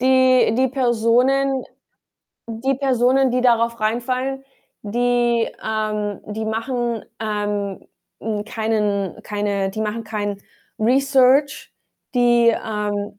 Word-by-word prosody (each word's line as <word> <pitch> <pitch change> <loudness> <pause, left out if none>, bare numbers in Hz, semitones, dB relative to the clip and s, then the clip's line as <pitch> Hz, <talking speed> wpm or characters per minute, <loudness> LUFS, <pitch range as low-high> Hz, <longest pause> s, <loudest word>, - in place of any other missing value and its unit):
die 255 -2 +4
die 260 +1 +3
Personen 255 +2 +2 0.8
die 235 +4 -1
Personen, 260 0 +2
die 250 - +1
darauf 235 -1 +2
reinfallen, 255 +4 -1 0.4
die, 240 +1 +1
ähm 215 -2 -2
die 215 +1 -4
machen, 230 +1 -2 0.2
ähm, 205 -2 -3 0.3
hm, 210 -1 -3
keinen 210 -4 -2
keine 205 -2 -2
die 215 - -6
machen 220 +1 -2
kein 205 -2 -4 0.4
Research. 270 +3 +3 0.4
Die, 240 -1 +4
ähm 205 -2 -3
230 Hz, 100 wpm, -21 LUFS, 210-255 Hz, 0.8 s, die